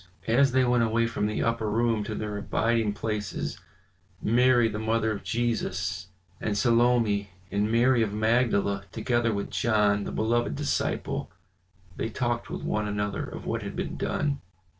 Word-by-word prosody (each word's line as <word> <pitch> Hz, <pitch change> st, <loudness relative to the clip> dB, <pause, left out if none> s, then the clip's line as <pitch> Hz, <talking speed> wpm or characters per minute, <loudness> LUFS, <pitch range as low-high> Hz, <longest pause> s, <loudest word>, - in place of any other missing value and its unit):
As 130 Hz, +4 st, +4 dB
they 130 Hz, 0 st, +3 dB
went 125 Hz, -1 st, +3 dB
away 115 Hz, +1 st, +2 dB
from 110 Hz, -2 st, -1 dB
the 105 Hz, -, -1 dB
upper 115 Hz, -2 st, 0 dB
room 115 Hz, 0 st, +1 dB
to 110 Hz, -, -4 dB
their 105 Hz, -1 st, -4 dB
abiding 110 Hz, +1 st, 0 dB
places, 105 Hz, -1 st, -3 dB, 0.6 s
Mary 120 Hz, +1 st, +4 dB
the 105 Hz, -1 st, -4 dB
mother 110 Hz, 0 st, +1 dB
of 105 Hz, -, -4 dB
Jesus, 100 Hz, -5 st, -2 dB, 0.3 s
and 105 Hz, -1 st, -1 dB
Salome, 115 Hz, -3 st, +3 dB, 0.2 s
and 105 Hz, +2 st, 0 dB
Mary 120 Hz, +1 st, +4 dB
of 110 Hz, -3 st, +1 dB
Magdala 105 Hz, -3 st, +1 dB
together 120 Hz, +1 st, 0 dB
with 100 Hz, -1 st, -3 dB
John, 105 Hz, -3 st, +2 dB
the -, -, -4 dB
beloved 115 Hz, -6 st, 0 dB
disciple, -, -, -2 dB, 0.7 s
they 110 Hz, -, -2 dB
talked 120 Hz, 0 st, -2 dB
with -, -, -5 dB
one 105 Hz, 0 st, -1 dB
another 105 Hz, -1 st, -2 dB
of -, -, -8 dB
what -, -, -2 dB
had -, -, -6 dB
been -, -, -3 dB
done. 145 Hz, -2 st, -1 dB
110 Hz, 160 wpm, -27 LUFS, 105-120 Hz, 0.7 s, As